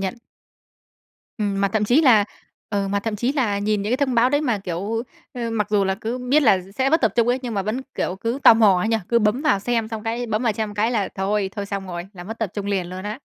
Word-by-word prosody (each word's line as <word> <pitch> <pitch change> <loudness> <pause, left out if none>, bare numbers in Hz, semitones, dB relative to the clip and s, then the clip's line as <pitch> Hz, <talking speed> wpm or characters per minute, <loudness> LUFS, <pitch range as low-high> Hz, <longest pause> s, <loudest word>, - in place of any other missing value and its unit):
nhận. 190 +2 -2 1.2
Ừm, 200 -2 -1
mà 200 - +2
thậm 215 +1 0
chí 245 +8 +4
là 225 -8 +6 0.5
ừ, 200 -2 -1
mà 200 +1 0
thậm 215 0 -3
chí 245 +6 0
là 230 -8 0
nhìn 205 0 0
những 205 - -3
cái 250 - +2
thông 255 - -2
báo 235 +2 +4
đấy 290 +1 +2
mà, 245 -8 0
kiểu, 195 +5 -3 0.3
ơ, 235 -2 -3
mặc 215 -3 0
dù 205 -2 +3
là 190 0 0
cứ 225 +5 -4
biết 260 +5 +2
là 215 -7 +5
s 195 +3 -16
sẽ 265 +1 +2
mất 320 - +3
tập 225 -5 +2
trung 235 0 +3
ấy, 250 - +2
nhưng 240 -3 -4
mà 195 - 0
vẫn, 215 +6 -2
kiểu, 185 - -2
cứ 230 +5 -2
tò - - +9
mò 210 -5 +5
ấy 195 - -1
nhỉ? 225 - +2
Cứ 235 - +4
bấm 215 +3 +1
vào 300 -10 +3
xem 225 +2 -1
xong 220 -1 -5
cái 235 +2 -2
bấm 220 +1 -1
vào 230 - +2
xem 210 0 -4
cái 215 +3 +1
là 215 -5 0
thôi, 195 0 -1
thôi 200 -1 -3
xong 195 -1 -4
rồi, 175 -1 -6
là 175 -3 -10
mất 225 +4 -7
tập 220 -5 -2
trung 205 -1 -4
liền 195 -3 -1
luôn 185 +1 -7
á. 210 +3 -5
215 Hz, 285 wpm, -22 LUFS, 200-235 Hz, 1.2 s, tò